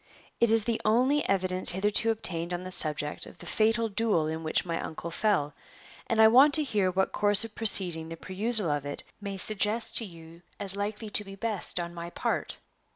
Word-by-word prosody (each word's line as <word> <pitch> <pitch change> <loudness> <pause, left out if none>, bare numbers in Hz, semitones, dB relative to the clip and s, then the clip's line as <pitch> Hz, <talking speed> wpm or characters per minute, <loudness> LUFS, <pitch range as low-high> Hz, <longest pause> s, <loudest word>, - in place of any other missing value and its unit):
It 235 - +3
is 225 -1 +5
the 230 0 -2
only 255 +7 +2
evidence 185 -1 0
hitherto 205 +4 +3
obtained 175 -6 -2
on 175 - -7
the 185 - -7
subject 150 -3 0
of - - -15
the - - -12
fatal 225 +1 0
duel 210 -6 0
in 160 +1 -4
which 155 - -1
my 165 -1 -3
uncle 170 +1 -7
fell, 170 -6 0 0.5
and 225 - -1
I 220 - +8
want 270 +6 +5
to 310 - +2
hear 205 -9 0
what 190 +1 -1
course 205 +1 +3
of 225 - -11
proceeding 180 -8 +2
the 165 - -8
perusal 200 0 0
of 145 -1 -2
it 145 0 -7 0.2
may 200 -1 -6
suggest 215 +3 +2
to 230 - +5
you 165 -2 -14 0.2
as 195 -1 +2
likely 210 +1 -5
to 210 - +1
be 195 -1 -11
best 205 -4 -2
on 170 0 -5
my 170 0 -8
part." - - -3
200 Hz, 205 wpm, -27 LUFS, 170-220 Hz, 0.5 s, I